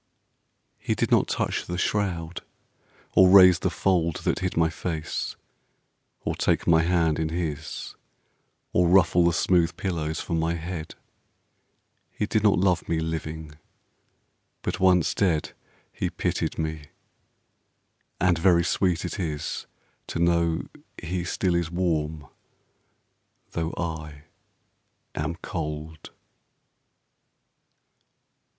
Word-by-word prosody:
He - - -1
did - - -1
not - - +4
touch - - -2
the 90 - -3
shroud, 90 -4 -1 0.7
or 95 -1 +7
raise 90 -2 +8
the - - 0
fold 85 -4 +1
That - - 0
hid 95 -2 -3
my 80 -1 +3
face, 80 -3 -4 0.9
or - - -2
take - - 0
my 80 -1 +5
hand 85 -2 +2
in 80 -1 0
his, 80 -2 -4 0.8
Or 90 0 +4
ruffle 90 -1 +5
the 85 - +4
smooth 85 0 +2
pillows 80 -4 -2
for - - -4
my 80 +1 +1
head: 85 -1 -6 1.1
He 105 - -3
did 110 0 +1
not 105 -1 +4
love 90 -2 +1
me 80 - +1
living; 80 -1 -5 1.0
but - - -2
once 90 -2 +4
dead 90 -6 0 0.4
He - - -2
pitied - - -2
me; 80 -1 -3 1.3
and 90 -2 +3
very 85 -1 +4
sweet 90 0 0
it 90 - -5
is 75 -5 -3 0.4
To - - -4
know 85 -1 +2 0.4
he 85 +1 -3
still 90 +1 0
is 85 -2 0
warm 80 -4 -1 1.3
though 80 0 -2
I 75 -3 -5 0.9
am 75 +2 -3
cold. 80 -2 -5
85 Hz, 115 wpm, -26 LUFS, 80-90 Hz, 1.3 s, raise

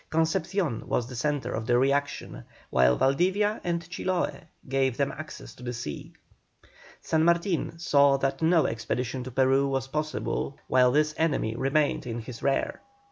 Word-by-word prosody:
Concepcion 160 - 0
was 120 - 0
the 125 +1 -9
centre 145 +3 -1
of 110 0 -4
the 120 - +4
reaction, 140 +2 0 0.3
while 65 -1 +4
Valdivia 190 +10 +2
and 170 -1 -2
Chiloe 180 -2 -2 0.2
gave 130 -2 +1
them 140 - +1
access 155 +1 -9
to - - -17
the 125 0 -4
sea. 115 -12 -6 0.9
San 160 0 +1
Martin 170 0 +1
saw 140 -4 +4
that 135 +2 -1
no 165 0 +4
expedition 125 +3 -2
to - - -5
Peru 135 +2 +3
was 135 -1 -1
possible 150 -1 -2
while 125 -1 +4
this 150 +2 +2
enemy 140 -9 +1
remained 135 +2 +1
in 115 -1 -3
his 115 0 -8
rear. 140 -1 0
140 Hz, 155 wpm, -27 LUFS, 125-160 Hz, 0.9 s, the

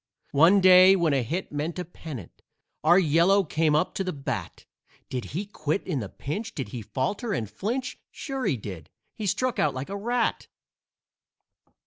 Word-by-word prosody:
One 170 +8 +5
day 185 +1 +8
when 170 -5 +2
a 135 - +2
hit 165 +11 -3
meant 150 +4 -3
a 180 - -3
pennant 150 - -10 0.4
Our 170 +3 +6
"Yellow" 180 +3 +4
came 155 -2 +1
up 155 +4 +1
to 195 - -2
the 185 - -2
bat; 140 -4 -5 0.5
Did 125 -2 -3
he 185 +8 -4
quit 155 -3 -3
in 160 -8 -2
the 100 -5 -5
pinch? 205 - -5
Did 135 - -4
he 125 -4 -6
falter 170 - -2
and 110 - -2
flinch? 250 - -4
Sure 270 -3 -5
he 130 - +1
did. 100 -6 -8 0.2
He 215 - -4
struck 245 +6 0
out 145 - +1
like 130 +5 -5
a 200 - -4
rat! 235 +3 -1
170 Hz, 175 wpm, -26 LUFS, 140-200 Hz, 0.5 s, day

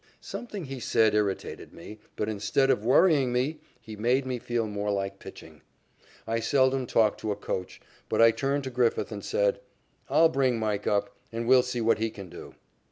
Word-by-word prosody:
Something 210 -7 -7
he 135 -1 -6
said 110 -2 +2
irritated 105 -2 -2
me, 105 +5 -11 0.2
but, 105 - -2
instead 110 +6 +1
of 120 -5 0
worrying 135 +1 +4
me, 130 +6 -1 0.3
it 110 -2 -9
made 125 +4 +1
me 130 -1 -3
feel 120 -1 -2
more 105 -1 -3
like 100 -1 -2
pitching. - - -12 0.6
I 115 +1 -1
seldom 130 +2 +2
talk 110 -2 +2
to 110 - -3
a - - -1
coacher, 95 -2 -5 0.3
but - - -1
I 115 0 +7
turned 135 +5 -1
to 130 - -5
Griffith 120 -1 0
and - - -6
said: - - +1 0.5
"I'll 165 0 +5
bring 135 -5 +1
Mike 105 -2 -2
up, 100 -1 0 0.2
and 115 0 -4
we'll 130 0 +6
see 125 -1 -3
what 115 -1 +2
he 110 0 0
can 100 -4 -10
do." - - -11
115 Hz, 190 wpm, -27 LUFS, 105-135 Hz, 0.6 s, I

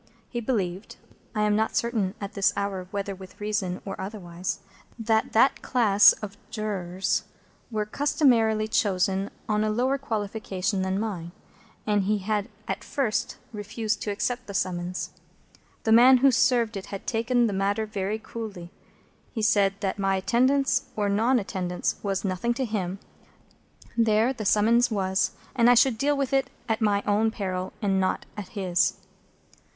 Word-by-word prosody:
He 240 - -3
believed—I 210 -1 -4
am 210 0 +3
not 220 +1 0
certain 220 -5 0
at 200 0 -6
this 200 -1 +2
hour 195 -2 -2
whether 200 0 -3
with 190 -1 -12
reason 205 -3 -2
or 195 -1 -5
otherwise—that 200 +4 -3
that 235 +5 +4
class 210 -5 +5
of 205 -1 -8
Jurors 195 -4 -2 0.4
were 215 -3 -1
customarily 230 -4 +2
chosen 195 -2 +1 0.2
on 210 0 +1
a 215 - +1
lower 255 +5 +1
qualification 205 -5 -2
than 190 +1 -1
mine, 180 -6 -4 0.5
and 205 -2 +1
he 210 +2 +2
had 205 +1 -2 0.2
at - - -3
first 245 -7 -1 0.2
refused 215 +1 -3
to - - -3
accept 245 +5 -2
the 200 - -7
summons. 180 -1 -2 0.7
The 220 - +1
man 250 +3 +8
who 270 +2 +5
served 235 -2 +2
it 190 - -7
had 195 - -7
taken 240 +1 +1
the 215 - 0
matter 200 +3 0
very 210 0 -2
coolly. 215 -6 -7 0.6
He 225 - -3
had - - +2
said 200 -2 +3
that 195 0 -2
my 195 0 +2
attendance 260 +6 +2
or 205 -1 0
non 225 +6 +3
attendance 180 -4 -2
was 195 -1 -2
nothing 195 +6 -1
to 260 0 -1
him; 195 -4 -2 1.0
there 225 +2 +3
the 225 -5 -6
summons 225 +4 +4
was; 190 -3 0 0.2
and 235 -1 +5
I 245 - +7
should 245 -1 +4
deal 290 +2 +2
with 275 -1 -1
it 270 -1 +2 0.2
at 225 0 -1
my 205 -2 +2
own 210 +2 +2
peril, 185 -4 -3
and 195 -1 +2
not 185 - 0
at 205 -3 -6
his. 185 -1 +2
210 Hz, 155 wpm, -26 LUFS, 195-230 Hz, 1.0 s, man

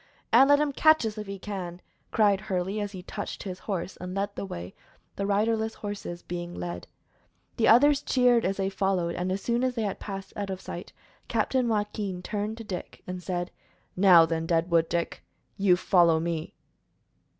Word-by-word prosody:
"And 270 - +7
let 285 - +7
him 300 -1 +1
catch 310 -1 +4
us 215 -1 -3
if 210 - -6
he 200 0 -5
can!" 185 -3 -6 0.3
cried 205 -3 +3
Hurley, 190 +2 -2
as 205 -1 -3
he 185 -3 -8
touched 205 +2 -6
his 185 -2 -6
horse 190 -3 -4
and 180 +1 -6
led 200 +1 -2
the 195 - -4
way, 90 - -7 0.4
the 200 - -2
riderless 220 +2 +1
horses 200 -4 -6
being 175 0 -5
led. 90 0 -5 0.7
The 225 - +3
others 285 +5 +6
cheered 245 -4 +3
as 195 +1 0
they 195 0 -1
followed, 190 -3 0
and 180 +2 -2
as 195 +1 -2
soon 240 +1 +1
as 255 -1 0
they 230 - -1
had 200 -2 -3
passed 195 -1 -7
out 200 -1 -4
of 190 -1 -4
sight, - - -8 0.4
Captain 255 -2 +1
Joaquin 205 -4 -2
turned 210 +2 -3
to 230 - -7
Dick 185 -4 -7
and 180 0 -5
said: 175 -1 -3 0.4
"Now, 180 -3 +7
then, 165 0 -2
Deadwood 165 -1 +2
Dick, 170 -1 -2 0.3
you 195 -3 +4
follow 170 -3 +4
me." 165 -1 -3
195 Hz, 185 wpm, -27 LUFS, 175-215 Hz, 0.7 s, And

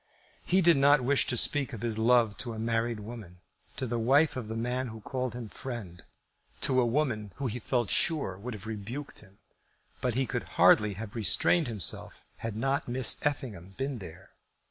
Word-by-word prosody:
He 185 +1 +2
did 170 -3 +6
not 140 +1 +5
wish 135 +2 +2
to 125 - +1
speak 140 +2 +4
of 110 - -6
his 110 -2 -2
love 115 -2 +3
to 120 -2 -3
a - - -7
married 115 0 -1
woman, 105 -5 -9 0.4
to - - -2
the 120 -1 -2
wife 140 +7 +3
of 125 -4 -5
the 110 - -5
man 125 +3 -2
who 110 -1 -8
called 130 +1 -3
him 120 -2 -6
friend, 105 -8 -7 0.6
to 130 -1 +4
a - - +2
woman 115 -6 -1
who 140 - -5
he 125 0 -3
felt 120 -1 -1
sure 150 - +1
would 110 +5 -7
have 105 0 -11
rebuked 110 +6 -6
him. 100 -2 -17 0.6
But 125 -3 -1
he 135 +1 +1
could - - -3
hardly 105 -2 +5
have 105 +1 -7
restrained 130 - +2
himself 110 -6 -2
had 115 -2 -5
not 135 +4 0
Miss 125 -1 +2
Effingham 105 -11 -3
been 135 -1 -3
there. 90 0 -11
120 Hz, 190 wpm, -29 LUFS, 110-130 Hz, 0.6 s, did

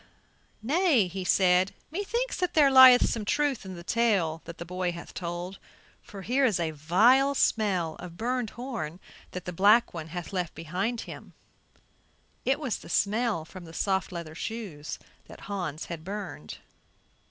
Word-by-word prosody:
"Nay," 280 - +3
said 180 0 +4
he, - - -26 0.2
"me - - -1
thinks 480 +4 -2
that 360 -2 -1
there 290 -3 +6
lieth 260 -1 +9
some 225 - -2
truth 280 0 0
in 190 -1 -7
the 170 - -9
tale 190 -8 +1
that 170 0 -9
the 170 - -7
boy 180 0 -2
hath 170 0 -9
told, 175 +2 -5 0.4
for 195 -3 -10
here 255 +8 +1
is 220 -9 +2
a 165 -2 -1
vile 225 - +4
smell 185 - +1
of 175 -1 -9
burned 245 +1 -1
horn 230 - -5 0.3
that 180 -1 -6
the 180 - -5
black 210 +7 +4
one 160 -2 -6
bath 175 +3 -7
left 180 -3 -2
behind 185 +9 -3
him." - - -10 1.1
It 270 +3 +2
was 265 -7 -2
the - - -13
smell 210 -4 +1
from 180 +2 -11
the 165 - -12
soft 190 +1 -1
leather 170 -3 -6
shoes 180 -6 -6 0.3
that - - -13
Hans 180 -6 -4
had 165 -2 -7
burned. 190 - -6
195 Hz, 165 wpm, -28 LUFS, 170-240 Hz, 1.1 s, lieth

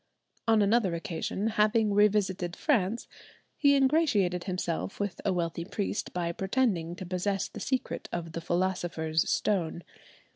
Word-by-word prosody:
On 220 -2 +5
another 200 -4 +2
occasion, 175 +2 -3
having 215 -1 +2
revisited 195 -4 +2
France, 230 - 0 0.5
he 285 -1 +4
ingratiated 260 - +2
himself 180 -1 -3
with 200 -4 -3
a 200 - +1
wealthy 170 -2 -1
priest 200 +3 -3
by 170 -1 -1
pretending 190 -3 0
to 185 -1 -7
possess 190 +2 -1
the - - -9
secret 260 -1 -2
of 165 -1 -4
the 170 - -5
philosopher's 175 -3 0
stone. 175 -4 0
190 Hz, 135 wpm, -29 LUFS, 175-215 Hz, 0.5 s, On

